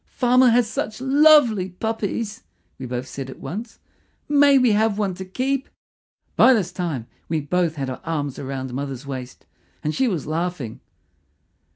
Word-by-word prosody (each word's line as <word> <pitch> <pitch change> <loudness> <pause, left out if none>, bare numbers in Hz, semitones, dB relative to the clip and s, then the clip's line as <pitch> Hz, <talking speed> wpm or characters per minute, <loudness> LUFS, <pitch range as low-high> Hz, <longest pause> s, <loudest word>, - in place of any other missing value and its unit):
"Farmer 250 0 +4
has 235 0 +3
such 215 0 -4
lovely 265 -7 +5
puppies," 220 +2 -3 0.4
we 130 - -5
both 125 +1 -4
said 135 -1 -6
at - - -9
once. 210 - -7 0.5
"May 285 -1 +5
we 250 -3 +4
have 210 0 +2
one 200 -3 0
to 190 - -7
keep?" 265 +7 -2 0.7
By 260 - +7
this 185 -5 -1
time 165 -10 -3 0.2
we 160 -1 0
both 165 +2 0
had 140 -3 -3
our 130 - -6
arms 145 -4 -3
round 130 -2 -5
mother's 135 0 -5
waist, 130 -2 -7 0.4
and 150 - -1
she 265 +7 +1
was 180 - -2
laughing. 155 -6 -3
180 Hz, 160 wpm, -22 LUFS, 140-235 Hz, 0.7 s, By